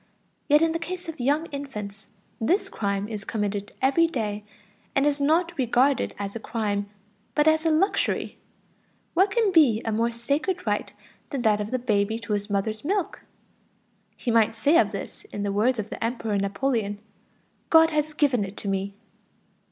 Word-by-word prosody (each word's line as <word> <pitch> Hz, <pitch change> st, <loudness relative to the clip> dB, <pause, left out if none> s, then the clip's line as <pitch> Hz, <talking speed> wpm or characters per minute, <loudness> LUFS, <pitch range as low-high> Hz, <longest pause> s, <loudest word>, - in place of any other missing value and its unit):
Yet 295 Hz, +2 st, +5 dB
in 330 Hz, -, +3 dB
the 330 Hz, -, -2 dB
case 355 Hz, +1 st, -6 dB
of 325 Hz, -3 st, -7 dB
young 290 Hz, +6 st, +1 dB
infants, 210 Hz, -8 st, -7 dB, 0.3 s
this 385 Hz, -, +1 dB
crime 200 Hz, -, -2 dB
is 210 Hz, -2 st, -6 dB
committed 205 Hz, -1 st, -3 dB
every 305 Hz, +5 st, +4 dB
day, 210 Hz, -8 st, -3 dB, 0.5 s
and 275 Hz, -, +3 dB
is 290 Hz, -1 st, +2 dB
not 335 Hz, +4 st, +2 dB
regarded 255 Hz, +2 st, +2 dB
as 200 Hz, 0 st, -5 dB
a -, -, -3 dB
crime, 205 Hz, -3 st, -2 dB, 0.5 s
but 300 Hz, 0 st, +3 dB
as 315 Hz, +1 st, +3 dB
a -, -, +4 dB
luxury. 320 Hz, +6 st, +1 dB, 0.7 s
What 380 Hz, +4 st, +4 dB
can 440 Hz, -1 st, +2 dB
be 290 Hz, -11 st, +5 dB
a 225 Hz, -, 0 dB
more 230 Hz, +2 st, +1 dB
sacred 285 Hz, +10 st, -2 dB
right -, -, -1 dB, 0.4 s
than 270 Hz, -4 st, -3 dB
that 210 Hz, -2 st, +3 dB
of 205 Hz, -, -4 dB
the 255 Hz, -, 0 dB
baby 220 Hz, -3 st, 0 dB
to 215 Hz, -2 st, -4 dB
his 205 Hz, +1 st, -2 dB
mother's 215 Hz, +2 st, -1 dB
milk? 380 Hz, +3 st, -1 dB, 1.0 s
He 240 Hz, -, -2 dB
might 225 Hz, -1 st, +3 dB
say 285 Hz, +9 st, +4 dB
of 205 Hz, -, +2 dB
this 200 Hz, -, -7 dB
in 205 Hz, -, -5 dB
the 200 Hz, -, -1 dB
words 230 Hz, +5 st, +2 dB
of 215 Hz, 0 st, -4 dB
the -, -, -5 dB
Emperor 225 Hz, -2 st, -1 dB
Napoleon: 205 Hz, +1 st, -1 dB, 0.7 s
"God 325 Hz, 0 st, +6 dB
has 305 Hz, 0 st, -1 dB
given 270 Hz, -8 st, +2 dB
it 195 Hz, +1 st, -7 dB
to -, -, -6 dB
me." 195 Hz, 0 st, -2 dB
235 Hz, 175 wpm, -25 LUFS, 205-305 Hz, 1.0 s, God